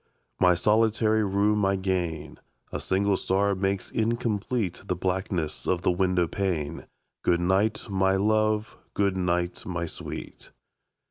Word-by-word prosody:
My 90 -1 +5
solitary 110 +2 +2
room 105 +1 +2
I 100 0 +3
gain. 90 -5 -2 0.3
A - - -3
single 100 +1 +1
star 100 +2 +1
makes 95 0 -2
incomplete 115 -3 -1
The 90 - 0
blackness 90 -3 -2
of 90 -1 0
the - - +3
window 90 -1 +2
pane. 85 -5 -2 0.4
Good 85 - +3
night, 95 +5 +1
my 95 -1 +2
love! 110 +1 +1 0.2
good 100 -1 +1
night, 90 -1 -1
my 85 -2 -3
sweet! 80 - -8
95 Hz, 130 wpm, -26 LUFS, 90-105 Hz, 0.4 s, My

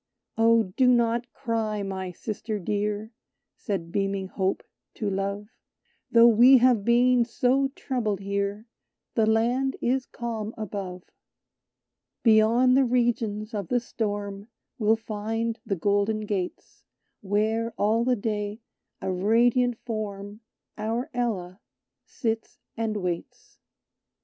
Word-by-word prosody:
"O 230 0 +4
do 260 - +4
not 235 0 +2
cry, 220 -3 -2
my 190 -1 -4
sister 215 +4 -4
dear," 210 +2 -2 0.4
Said 175 -6 -4
beaming 195 0 -1
Hope 190 0 -1 0.3
to 215 - -3
Love, 200 +1 -2 0.6
"Though 230 0 +7
we 240 +4 +7
have 245 -4 +4
been 245 +2 +4
so 255 +3 +1
troubled 225 -7 -2
here 200 +2 -2 0.5
The 220 -2 +2
Land 240 +5 +2
is 255 +2 0
calm 225 -2 -5
above; 190 -4 -5 1.2
"Beyond 230 +3 +5
the 270 - +5
regions 235 -3 0
of 200 -4 -3
the 245 - +2
storm 205 -3 -4 0.3
We'll 220 0 +4
find 225 +1 -3
the 200 - 0
golden 205 +4 +1
gates, 200 -4 -5 0.4
Where, 220 +3 0
all 220 +3 +2
the 250 +1 +2
day, 210 -1 -3 0.4
a 190 - -1
radiant 235 +5 +2
Form, 205 -2 -5 0.4
Our 230 +7 -2
Ella, 200 -7 -2 0.5
sits 225 -3 -3 0.2
and 225 -2 -2
waits." 180 -3 -5
220 Hz, 115 wpm, -26 LUFS, 205-235 Hz, 1.2 s, Though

